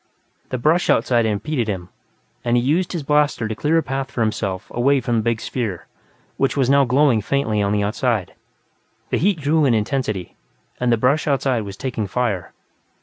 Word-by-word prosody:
The 130 - -2
brush 155 +8 +2
outside 115 0 +3
impeded 115 +4 -1
him, 95 -4 -4 0.5
and 120 0 +2
he 120 - +1
used 165 +7 +1
his 170 -5 -3
blaster 150 -5 +1
to 110 - -3
clear 150 +8 +1
a 165 - +2
path 135 +1 -3
for 120 - -3
himself 105 -3 -2
away 135 +3 +3
from 120 -2 -1
the - - +2
big 115 0 0
sphere, 110 -10 -4 0.5
which 135 +1 0
was 135 -1 +2
now 140 0 +5
glowing 130 -2 +3
faintly 110 -2 0
on 100 0 +1
the 105 0 +1
outside. 110 -2 -1 0.8
The - - +2
heat 185 -1 +1
grew 155 +2 +3
in 130 -5 +3
intensity, 105 -4 -2 0.4
and 125 -1 +1
the 115 - +3
brush 135 +8 +1
outside 135 -4 +1
was 100 -1 -8
taking 115 -2 -3
fire. 100 -5 -2
125 Hz, 190 wpm, -21 LUFS, 110-140 Hz, 0.8 s, now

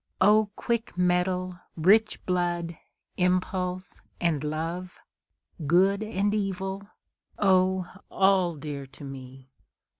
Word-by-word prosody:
O 210 +1 +5
quick 235 -5 -2
mettle, 180 0 +1 0.2
rich 210 +7 +3
blood, 175 -2 -1 0.4
impulse, 180 0 -1 0.2
and 160 -5 0
love! 165 +4 -4 0.7
Good 190 +5 +4
and 205 -1 0
evil! 195 -1 -3 0.5
O 185 -2 +3 0.2
all 190 -3 +3
dear 145 -2 -6
to 140 - -14
me! 135 -1 -10
180 Hz, 95 wpm, -27 LUFS, 170-195 Hz, 0.7 s, O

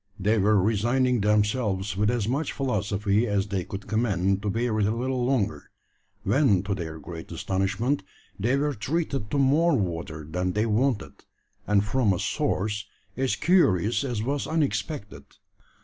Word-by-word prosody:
They 105 +3 +2
were 105 +1 +4
resigning 120 +4 +2
themselves 105 -1 +1
with 105 +2 +1
as 120 -4 0
much 140 +6 -1
philosophy 105 -4 0
as 100 -1 0
they 95 -3 -1
could 100 0 -7
command 100 -3 +1
to 105 - -1
bear 115 +1 0
it 100 - +2
a 110 - 0
little 125 +1 -1
longer, 125 -5 -1 0.5
when 125 -10 +3
to 100 0 -1
their 80 -4 -5
great 80 +1 -9
astonishment 95 - -1 0.4
they 120 +7 +2
were 145 +1 0
treated 135 -2 -2
to 145 - -1
more 145 +4 +4
water 80 -5 -3
than 90 +3 -2
they 105 +2 +1
wanted, 115 0 -1 0.4
and 105 -1 +3
from 110 -2 +2
a 90 - -2
source 105 +1 -1 0.3
as 130 0 0
curious 120 - +3
as 120 -5 -2
was 140 +3 -1
unexpected. 105 - -2
105 Hz, 155 wpm, -26 LUFS, 100-130 Hz, 0.5 s, were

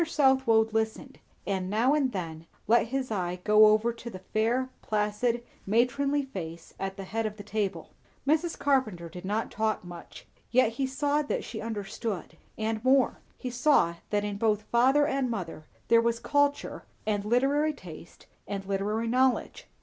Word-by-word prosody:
Southwode 265 -8 +3
listened, 220 0 -2 0.3
and 190 -2 -2
now 230 +7 +3
and 280 -4 +2
then 165 -5 -5 0.2
let 235 +2 +4
his 260 0 -2
eye 180 -3 -2
go 215 0 +7
over 215 +2 +3
to 235 +1 -8
the 190 - -8 0.2
fair, 235 +4 +2
placid, 215 +3 0 0.2
matronly 275 +6 +2
face 170 -9 -7
at 195 0 -4
the 195 - -5
head 220 +3 -2
of 210 0 -7
the 205 - -8
table. 205 -1 -3 0.4
Mrs. 320 +3 +1
Carpenter 235 -12 +1
did 180 +2 -9
not 210 +4 -2
talk 220 -2 -1
much; 175 -1 -11 0.2
yet 245 -1 +4
he 265 +4 -1
saw 290 +2 +1
that 290 - -2
she 220 - -6
understood. 210 -5 -4 0.2
And 220 0 -2
more; 260 0 +3 0.2
he 250 - -5
saw 240 - +3
that 205 -1 +1
in 205 -1 -3
both 215 -1 +1
father 265 +6 +4
and 270 -3 0
mother 165 -8 -5 0.2
there 230 0 +6
was 235 0 +1
culture 285 +1 0 0.2
and 205 -2 0
literary 275 +7 +2
taste 170 - -12 0.2
and 195 0 -4
literary 205 +4 -1
knowledge. 255 +2 +1
225 Hz, 165 wpm, -28 LUFS, 200-260 Hz, 0.4 s, go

